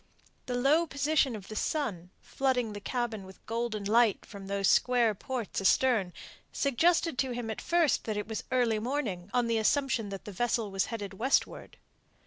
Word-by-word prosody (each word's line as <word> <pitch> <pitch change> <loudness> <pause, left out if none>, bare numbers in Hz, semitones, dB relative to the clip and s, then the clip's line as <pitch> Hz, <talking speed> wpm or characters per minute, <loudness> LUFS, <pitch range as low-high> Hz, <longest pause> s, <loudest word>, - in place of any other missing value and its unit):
The 250 - -2
low 295 +7 +3
position 280 -3 +1
of 200 -3 -9
the 215 - -7
sun, 205 - -2
flooding 250 -5 -1
the 205 - -6
cabin 235 -3 -3
with 190 0 -15
golden 230 -2 -2
light 220 0 +3
from 200 -2 -10
those 200 0 0
square 245 -3 +3
ports 235 0 -4
astern, 205 -1 +3 0.4
suggested 325 +2 +2
to 260 -2 0
him 235 -2 -3
at 220 - -6
first 340 -4 +2
that 215 -2 -2
it 210 - -3
was 220 -1 -4
early 240 -4 +2
morning, 215 -7 -3
on 245 -1 +2
the 230 -1 +1
assumption 235 -1 +1
that 195 +1 -7
the 210 - -6
vessel 225 +1 -1
was 195 0 0
headed 205 -4 -5
westward. 250 +8 -1
230 Hz, 175 wpm, -30 LUFS, 205-260 Hz, 0.4 s, low